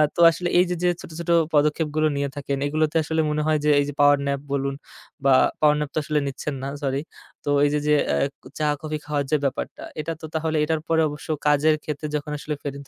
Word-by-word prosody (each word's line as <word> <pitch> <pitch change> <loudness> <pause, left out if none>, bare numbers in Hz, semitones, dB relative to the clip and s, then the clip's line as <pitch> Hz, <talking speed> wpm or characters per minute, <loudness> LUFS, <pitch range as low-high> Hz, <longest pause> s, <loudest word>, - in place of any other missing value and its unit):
তো - - -6
আসলে 175 +1 -3
এই 180 - +5
যে, 180 - 0
যে 180 - +4
ছোট, - - -11
ছোট 170 0 -5 0.2
পদক্ষেপগুলো 150 +1 +2
নিয়ে 140 0 -1
থাকেন, 140 0 -2
এগুলোতে 155 +1 0
আসলে 160 +1 0
মনে 150 - 0
হয় 155 -1 +2
যে, - - +4
এই 145 - +2
যে - - -5
পাওয়ার 145 0 +6
ন্যাপ 140 0 -1
বলুন 140 0 -1 0.5
বা 135 - +6 0.3
পাওয়ার 150 -1 +5
ন্যাপ 150 -1 -2
তো - - +2
আসলে 150 0 0
নিচ্ছেন 140 +2 -4
না, 135 - -2 0.2
সরি। 135 +1 0 0.4
তো - - -1 0.2
এই - - +3
যে, 150 - +2
যে 150 - +5 0.2
আ - - +1 0.3
ক - - -27
চা-কফি 150 +1 -1
খাওয়ার 145 -1 -1
যে 155 - +4
ব্যাপারটা, 135 +1 -3 0.2
এটা 165 +2 -4
তো - - -6
তাহলে 160 0 0
এটার 160 -1 -1
পরে 165 -1 +3
অবশ্য 150 +1 -9 0.2
কাজের 150 +1 +4
ক্ষেত্রে 150 0 -4
যখন 150 0 -3
আসলে 150 +1 -4
ফেরত 140 -1 -6
150 Hz, 230 wpm, -23 LUFS, 145-155 Hz, 0.5 s, পাওয়ার